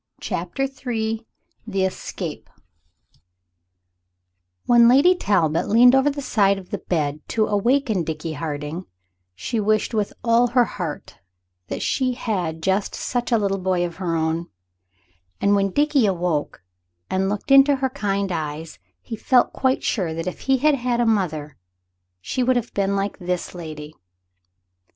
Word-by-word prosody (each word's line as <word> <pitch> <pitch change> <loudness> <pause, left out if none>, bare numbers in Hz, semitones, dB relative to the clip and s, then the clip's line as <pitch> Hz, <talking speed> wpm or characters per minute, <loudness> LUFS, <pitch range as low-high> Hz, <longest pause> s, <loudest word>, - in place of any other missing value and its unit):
CHAPTER 270 - -3
III 230 -4 -3 0.4
THE 195 -3 0
ESCAPE 190 - -5 2.2
WHEN 235 -1 +6
Lady 280 +9 +6
Talbot 170 - +1
leaned 240 +4 +7
over 270 +2 +4
the 285 0 -5
side 200 -5 +2
of 190 -2 -11
the - - -3
big - - -32
bed 150 -4 0
to 220 -1 +1
awaken 220 - +1
Dickie 160 0 -4
Harding 150 +3 -5 0.5
she 220 - -3
wished 215 +2 +1
with 210 -2 -1
all 235 +1 +4
her 245 0 +3
heart 170 -9 -6 0.5
that - - -4
she 255 -1 0
had 180 -10 -3
just 195 +2 0
such 245 -1 -3
a 230 - +5
little 195 -2 0
boy 185 -1 0
of 170 -1 -7
her 175 -3 -2
own; 160 +1 -1 0.9
and 200 - +3
when 195 0 +2
Dickie 285 0 +2
awoke 175 - -2 0.4
and 190 +1 0
looked 210 +6 -4
in 275 0 +9
her 270 -2 +1
kind 200 -4 -1
eyes 155 -1 -5 0.2
he 230 - -6
felt 250 +3 +2
quite 260 0 0
sure 175 -7 -1
that 165 - -4
if 185 - -5
he 270 -1 +2
had 300 +4 +3
had 245 -3 -1
a 240 - +3
mother 160 -10 -1 0.6
she 90 - -3
would 255 +1 +3
have 235 -1 -2
been 200 0 0
like 200 +1 -2
this 180 -1 -3
lady. 155 -3 -8
200 Hz, 155 wpm, -22 LUFS, 170-245 Hz, 2.2 s, in